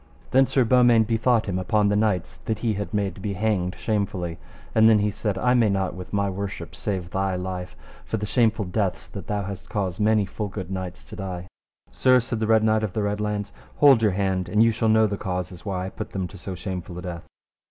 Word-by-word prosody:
Then 135 +1 +5
Sir 130 -1 +3
Beaumains 120 -2 +5
bethought 115 +1 +2
him 95 -2 -2
upon 105 +3 +2
the 105 - +2
knights 105 -4 0
that 110 - -1
he 110 - +2
had 100 0 -4
made 100 -3 0
to 95 - -12
be 100 +1 -2
hanged 95 -3 0
shamefully, 95 -6 -2 0.3
and 110 0 +6
then 110 - +6
he 105 0 +1
said: 100 0 -2
I 125 +6 +2
may 120 -4 +4
not 95 -2 0
with 90 0 -9
my 100 -1 +1
worship 95 -3 -5
save 95 -3 -3
thy 95 -1 0
life, 90 -1 -5 0.3
for 110 - -3
the 105 - -3
shameful 110 -2 +2
deaths 95 0 -2
that 95 -4 -8
thou 105 -1 -1
hast 100 0 -7
caused 95 -3 -2
many 105 -1 +3
full 105 +2 -4
good 95 -2 -6
knights 95 -1 -5
to 105 - -11
die. 90 -3 -5 0.4
Sir, 130 -1 +4
said 115 -1 -3
the 110 - 0
Red 110 -1 +4
Knight 110 0 +3
of 105 -4 -2
the 105 - -1
Red 105 0 -1
Launds, 105 -1 -2 0.2
hold 140 -5 +6
your 105 -4 +3
hand 95 -1 -1
and 105 +1 +4
ye 115 - +4
shall 110 0 0
know 110 0 +5
the 100 -1 -2
causes 90 0 -4
why 95 -2 -2
I - - -4
put 110 +2 -7
them 95 -2 -2
to 100 - -11
so 95 0 -5
shameful 90 -1 -6
a 90 - -6
death. 85 -2 -6
100 Hz, 235 wpm, -24 LUFS, 95-110 Hz, 0.4 s, and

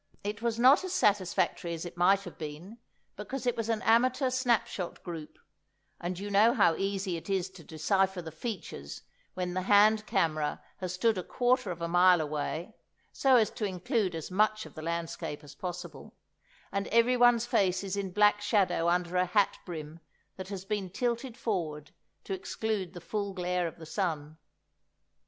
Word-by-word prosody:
It 205 +1 -4
was 230 -1 0
not 260 +8 +6
as 370 -1 -4
satisfactory 185 - +1
as 165 - -6
it 175 - -8
might 190 +3 +4
have 175 -4 -11
been, 165 +9 -8 0.4
because 250 +5 -5
it 245 - +1
was 230 -1 -3
an 225 -2 0
amateur 255 +3 +3
snapshot 235 -8 -1
group, 165 -4 -7 0.6
and 175 +1 -4
you 205 +2 -5
know 215 +4 +5
how 185 -7 +4
easy 195 -2 -2
it 165 - -10
is 190 -1 0
to 185 -3 -13
decipher 190 +5 0
the 165 -2 -7
features 160 - -6 0.3
when 180 -1 -2
the 185 - -1
hand 210 +2 +4
camera 155 -2 0 0.2
has 185 -2 -4
stood 215 +1 +2
a - - -4
quarter 250 -1 +1
of 170 -1 -5
a - - 0
mile 175 +1 +5
away 155 +5 -3 0.4
(so 265 -1 +4
as 220 -4 +4
to 215 - -3
include 190 - -1
as 160 +2 -6
much 215 +2 +2
of - - -12
the 155 - -8
landscape 165 -2 -4
as 145 -1 -12
possible), 175 +3 -7 0.6
and 200 0 -2
everyone's 240 0 +4
face 190 -4 +1
is 195 0 -3
in 200 -1 -2
black 210 +2 +4
shadow 195 -5 +2
under 175 0 0
a 180 0 +2
hat 200 +3 +2
brim 160 -2 -7 0.4
that 190 -1 -7
has 195 -1 -6
been 200 -2 -2
tilted 235 +4 -2
forward 155 -9 -3 0.3
to 195 - -4
exclude 190 -1 -3
the 175 - -9
full 200 +3 -3
glare 180 -1 -1
of 165 - -9
the 165 - -10
sun. 160 -4 -3
190 Hz, 180 wpm, -30 LUFS, 175-215 Hz, 0.6 s, not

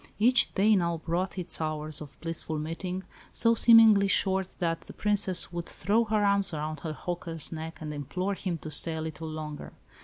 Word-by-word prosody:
Each 240 +4 +4
day 210 +2 +4
now 170 -3 0
brought 175 +4 -3
its 180 -2 -1
hours 155 -1 0
of 145 -2 -11
blissful 165 -1 -3
meeting, 175 +4 -4 0.3
so 230 0 +2
seemingly 225 -3 +6
short 190 -1 0
that 165 -2 -1
the - - -12
Princess 200 -4 +2
would 170 0 -4
throw 215 +6 +1
her 215 -1 +1
arms 200 -4 +1
around 155 +1 -4
her 160 -2 -5
"hawker's" 165 -1 -3
neck 160 0 -6
and 150 -1 -6
implore 180 +7 -3
him 185 -3 -3
to 155 - -6
stay 160 +2 0
a 160 - -4
little 160 0 -6
longer. 155 -2 -7
170 Hz, 185 wpm, -28 LUFS, 155-200 Hz, 0.3 s, seemingly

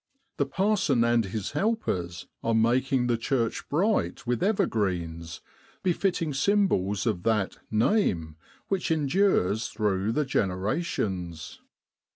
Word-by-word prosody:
The 140 - +1
parson 185 - +2
and 120 -1 +3
his 100 +1 -4
helpers 145 - -1 0.2
are 115 0 +1
ma 115 +2 +4
king 135 -2 0
the 120 -1 +1
church 115 -1 -1
bright 150 - 0
with 125 +3 -1
ever 200 0 +2
greens, 85 - -3 0.4
befitting 175 -3 0
symbols 135 - +1
of 105 -7 0
that 105 -2 0
Name 105 - +1 0.3
which 195 -3 -1
endures 145 - +2
through 105 0 0
the 150 +2 +1
generations. 95 - -2
115 Hz, 120 wpm, -27 LUFS, -, 0.4 s, ma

